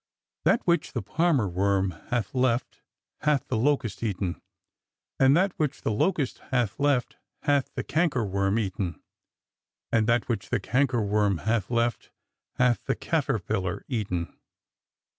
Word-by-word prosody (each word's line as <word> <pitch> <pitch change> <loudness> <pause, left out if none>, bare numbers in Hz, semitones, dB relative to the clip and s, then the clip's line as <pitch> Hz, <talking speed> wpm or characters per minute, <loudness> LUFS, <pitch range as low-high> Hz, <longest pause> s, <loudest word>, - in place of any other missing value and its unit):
That 235 - +4
which 170 -1 +1
the 120 - -2
palmer 145 - +2
worm 95 +1 +1 0.2
hath 120 -6 -1
left 125 -2 0 0.4
hath 145 -3 +1
the 130 - -1
locust 130 -1 0
eaten; 95 -5 -2 0.8
and 135 +3 +6
that 190 +1 +2
which 150 -3 -1
the - - +1
locust 145 - 0
hath 125 -6 0
left 140 -3 +1 0.3
hath 145 -2 +2
the - - -2
canker 155 -7 +1
BORDER 100 - -6
WARFARE 100 +1 +1
BEGINS 110 -4 +1
203 95 - -2
womi - - -4
eaten; - - -29 0.9
and 110 -1 +3
that 115 0 +2
which 115 -5 -2
the - - +1
cankerworm 105 -7 +1
hath 110 -3 0
left 120 0 0 0.5
hath 125 -4 +2
the - - 0
caterpillar 95 +1 -1
eaten." 95 -9 -2
115 Hz, 150 wpm, -27 LUFS, 100-135 Hz, 0.9 s, and